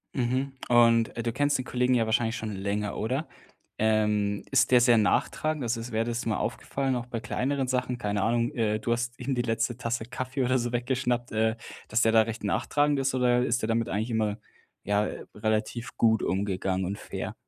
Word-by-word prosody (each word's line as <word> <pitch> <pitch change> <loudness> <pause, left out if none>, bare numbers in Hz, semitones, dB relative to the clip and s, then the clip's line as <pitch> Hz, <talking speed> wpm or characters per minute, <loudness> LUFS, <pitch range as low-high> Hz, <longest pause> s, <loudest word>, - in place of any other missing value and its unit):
Mhm, 130 +2 0 0.2
und, 115 -1 +4
äh, 115 - -2
du 115 - -1
kennst 145 +2 +2
den 130 - -5
Kollegen 125 0 +1
ja 115 -2 +3
wahrscheinlich 115 +1 +1
schon 110 -2 -4
länger, 100 +1 -2
oder? 130 +9 -2 0.5
Ähm, 105 -2 +1
ist - - +3
der 125 -1 +7
sehr 120 -1 +5
nachtragend, 155 +8 +1
also 115 -1 -1
s 115 +2 -7
wäre 110 0 0
das 120 0 -3
mal 110 -2 0
aufgefallen, 135 -1 -2
auch 120 -1 -3
bei 125 -2 -4
kleineren 130 +5 -1
Sachen, 125 -1 -1
keine 105 -2 -1
Ahnung, 120 +1 +1
äh, 110 -3 +1
du 115 - -2
hast 120 +1 -2
ihm 130 +2 -2
die 120 - 0
letzte 115 +1 -1
Tasse 115 -2 -2
Kaffee 130 +2 -3
oder 130 +1 +2
so 120 -1 -2
weggeschnappt, 125 0 -1
äh, 110 +1 +1 0.3
dass 110 +2 +1
der 115 - +4
da 110 0 +6
recht 115 0 -6
nachtragend 145 +9 +1
ist 135 0 0
oder 125 -1 +3
ist 125 0 0
der 110 - -1
damit 115 +1 0
eigentlich 110 +4 -2
immer, 110 -2 0 0.5
ja, 105 +1 +1
äh, - - -6
relativ 110 +2 -2
gut 110 -1 +3
umgegangen 95 0 -1
und 100 +3 -3
fair? - - -6
115 Hz, 205 wpm, -27 LUFS, 110-125 Hz, 0.5 s, der